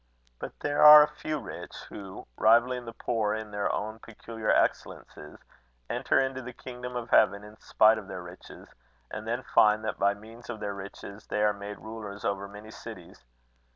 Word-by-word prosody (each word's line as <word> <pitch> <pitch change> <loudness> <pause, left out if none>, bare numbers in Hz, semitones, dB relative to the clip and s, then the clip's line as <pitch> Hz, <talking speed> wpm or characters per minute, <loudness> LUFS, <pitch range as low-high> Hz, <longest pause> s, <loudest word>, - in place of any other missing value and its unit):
But - - -8
there 145 0 0
are 150 0 +11
a - - 0
few 155 0 -2
rich, 135 - -9
who, 95 -2 -9
rivalling 120 - +3
the 115 - -7
poor 110 -2 -1
in 110 -1 -7
their 105 0 -1
own 110 +2 -4
peculiar 115 -1 -7
excellences, 75 - -1 0.5
enter - - +1
into 130 -1 -1
the 125 0 -8
kingdom 125 0 -8
of 120 -1 -5
heaven 100 +1 +4
in 105 +1 -13
spite 110 +1 +4
of 100 - -12
their 95 -2 -7
riches; 90 +1 -12 0.4
and 110 +1 -6
then 120 +3 -2
find 105 0 +3
that 110 - -3
by 100 0 +2
means 115 +4 -14
of 115 -3 -5
their 105 -1 -4
riches 100 +1 -10
they 105 - -1
are 105 0 +3
made 100 0 -8
rulers 105 -2 -8
over 100 0 -2
many 105 +2 -12
cities. 65 - -11
110 Hz, 185 wpm, -28 LUFS, 100-120 Hz, 0.5 s, are